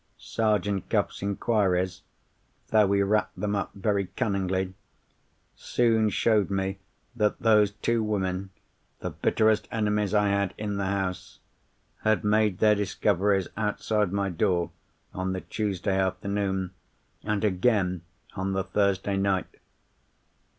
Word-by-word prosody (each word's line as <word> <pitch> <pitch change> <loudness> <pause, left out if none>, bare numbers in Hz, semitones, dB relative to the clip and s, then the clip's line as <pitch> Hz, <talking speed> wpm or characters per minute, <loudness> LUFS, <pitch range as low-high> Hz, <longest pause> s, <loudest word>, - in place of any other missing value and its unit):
Sergeant 105 -3 -1
Cuff's - - 0
inquiries—though 100 0 -1
he 100 0 +3
wrapped 105 +2 0
them 105 0 -1
up 100 - -1
very 100 -1 0
cunningly—soon 100 +4 -2
showed 105 0 +2
me 95 0 -2 0.4
that 105 -3 +1
those 105 -2 +4
two 115 +2 0
women 95 -3 -1 0.5
(the - - -3
bitterest 110 -1 +2
enemies 105 -2 0
I 105 -1 +3
had 100 -1 0
in 105 -1 -3
the 100 -1 -1
house) 95 -1 -3 0.6
had 110 +1 +2
made 105 -2 +2
their 105 +1 +5
discoveries 100 -1 +1
outside 105 -1 0
my 100 0 0
door, 85 +1 0 0.4
on 95 0 -2
the 95 - -3
Tuesday 100 -2 -1
afternoon, 95 0 -1 0.5
and 105 -1 -1
again 95 -3 +1 0.3
on 95 +1 -2
the 95 0 0
Thursday 100 0 0
night. 95 -1 0
100 Hz, 115 wpm, -27 LUFS, 95-105 Hz, 0.6 s, their